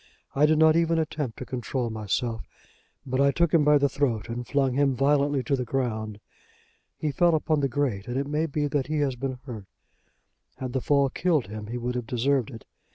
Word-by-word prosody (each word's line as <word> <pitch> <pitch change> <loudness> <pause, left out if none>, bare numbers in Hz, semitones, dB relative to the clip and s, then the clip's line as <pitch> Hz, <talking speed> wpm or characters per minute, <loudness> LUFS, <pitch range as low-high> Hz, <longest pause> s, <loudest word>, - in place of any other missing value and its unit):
"I 145 +2 +4
did 155 0 +3
not 160 0 +5
even 165 0 +2
attempt 150 -6 -2
to 130 - -6
control 125 -1 -3
myself; 110 +2 -3 0.6
but 130 0 0
I 140 - +5
took 170 +3 +1
him 165 -3 +5
by 150 0 +5
the 140 0 +3
throat 130 -5 -1
and 120 +1 -5
flung 135 -3 +1
him 135 0 +2
violently 140 0 +2
to 140 - +1
the 130 - -2
ground. 110 -4 -3 0.8
He 155 - -1
fell 170 +3 +3
upon 155 0 +1
the 140 -1 0
grate, 120 -6 -1
and 120 +1 -3
it 140 - 0
may 150 +3 -1
be 150 0 -1
that 145 -2 -1
he 155 +1 -1
has 135 -3 0
been 130 +1 -4
hurt. 110 -7 -8 0.9
Had 130 -2 -5
the 130 - 0
fall 140 -1 +2
killed 160 -7 +1
him 105 0 -7
he 120 +3 -4
would 125 +1 -3
have 125 -2 -4
deserved 130 +1 +1
it. 115 -4 -11
135 Hz, 215 wpm, -26 LUFS, 120-145 Hz, 0.9 s, not